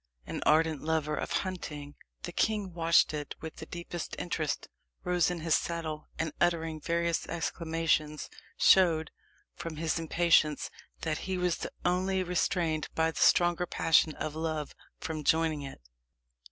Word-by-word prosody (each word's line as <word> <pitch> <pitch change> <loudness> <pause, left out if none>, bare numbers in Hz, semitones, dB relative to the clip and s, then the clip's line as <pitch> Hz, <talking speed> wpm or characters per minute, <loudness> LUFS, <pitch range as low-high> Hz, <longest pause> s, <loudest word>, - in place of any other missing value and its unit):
An - - -5
ardent 155 -1 +3
lover 155 -1 0
of - - -4
hunting, 150 -6 -3 0.3
the - - -4
king 210 -4 0
watched 165 -2 +4
it 150 -1 -4
with 160 -1 -8
the - - -8
deepest 170 -1 -6
interest, 155 -5 -2 0.4
rose 180 -1 +2
in 175 -2 -3
his 165 0 +1
saddle, 160 -3 -2
and 160 -1 -1
uttering 165 -2 +1
various 170 0 0
exclamations, 165 -2 -1 0.3
showed, 165 -4 +5 0.4
from 165 -1 -6
his 165 +1 -1
impatience, 165 -2 +2 0.3
that 155 -1 -1
he 190 - 0
was 180 -2 0 0.2
only 185 +1 +1
restrained 170 -3 0
by 160 0 +2
the - - -7
stronger 175 0 +4
passion 160 -2 +3
of 155 - -4
love 155 -2 -3 0.3
from 160 -4 -4
joining 160 -1 +2
it. 135 -1 -8
165 Hz, 140 wpm, -30 LUFS, 155-175 Hz, 0.4 s, showed